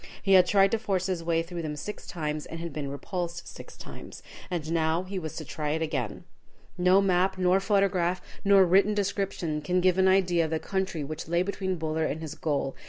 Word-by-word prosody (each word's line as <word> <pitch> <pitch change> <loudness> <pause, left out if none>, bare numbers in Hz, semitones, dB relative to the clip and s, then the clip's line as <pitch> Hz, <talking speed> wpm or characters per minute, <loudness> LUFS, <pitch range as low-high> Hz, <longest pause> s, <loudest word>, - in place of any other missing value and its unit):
He 195 - +3
had 180 -1 +7
tried 195 0 +4
to 225 - +1
force 195 -4 -1
his 185 -3 -2
way 165 0 +1
through 170 0 -6
them 155 -2 -4
six 210 +8 -7
times, 150 -3 -4
and 165 - -7
had 170 -2 -5
been 145 -2 -4
repulsed 175 +4 -5
six - - -11
times. - - -10 0.3
And 165 -4 -3
now 165 +1 +1
he 190 +1 -4
was 160 -3 -6
to 155 - -6
try 150 +1 -3
it 160 +1 -1
again. 135 -9 -3 0.5
No 180 +2 +4
map, 190 0 +2
nor 185 +1 +3
photograph, 190 -3 +1 0.2
nor 195 -1 +6
written 195 +4 +4
description 195 -6 -2
can 180 +5 +1
give 185 0 +3
an 190 - +5
idea 180 -3 +3
of - - -4
the 160 - 0
country 190 -5 -2
which 155 +3 -6
lay 170 +2 +2
between 190 -1 -2
Buller 160 -1 -1
and 155 - -2
his 160 -2 -6
goal. 140 -3 -2
175 Hz, 215 wpm, -27 LUFS, 160-190 Hz, 0.5 s, had